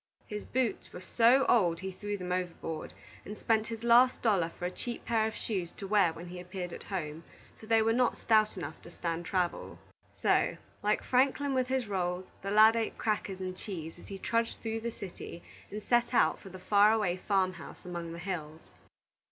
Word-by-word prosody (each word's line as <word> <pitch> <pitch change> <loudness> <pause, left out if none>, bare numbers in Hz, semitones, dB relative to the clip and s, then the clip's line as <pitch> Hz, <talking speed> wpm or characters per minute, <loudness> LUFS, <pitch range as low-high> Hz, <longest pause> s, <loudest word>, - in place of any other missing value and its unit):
His 210 0 -6
boots 255 -3 -1
were - - -8
so 240 +7 +4
old 175 -8 +3
he 190 0 -4
threw 205 +2 -4
them 180 -1 -5
overboard, 175 -3 -3 0.3
and 210 +1 -8
spent 220 -1 +1
his 230 -1 -6
last 240 +2 +6
dollar 195 -8 +3
for 175 - -7
a 180 - -1
cheap 235 +5 -6
pair 225 -2 +2
of 220 - -5
shoes 185 -6 -3
to 200 - -8
wear 200 -4 +4
when 165 +2 -9
he 180 0 -7
appeared 180 -1 -6
at - - -8
home, 165 -4 -5 0.4
for 220 - -12
they 225 0 +4
were 225 +1 +3
not 245 0 +2
stout 215 -2 +3
enough 160 -3 -6
to - - -12
stand 170 0 -4
travel. 180 -2 -1 0.3
So, - - +1 0.2
like 210 +1 +1
Franklin 270 +2 +2
with 255 -1 +1
his 260 -1 0
rolls, 180 -2 -1 0.2
the 195 - -4
lad 215 +2 +7
ate 230 -1 -1
crackers 205 -3 -1
and 185 -1 -4
cheese 165 -5 -7
as - - -13
he 195 - -6
trudged 230 +3 -1
through 225 0 -2
the 235 +1 -3
city, 185 -5 -8 0.3
and 210 +1 -6
set 240 +2 +2
out - - +4
for 195 - -11
the 185 - -9
far 205 +3 +5
away 205 -5 +1
farm 185 -1 +1
house - - -11
among 170 -2 -5
the 170 - -7
hills. 165 -4 -5
200 Hz, 205 wpm, -31 LUFS, 180-225 Hz, 0.4 s, lad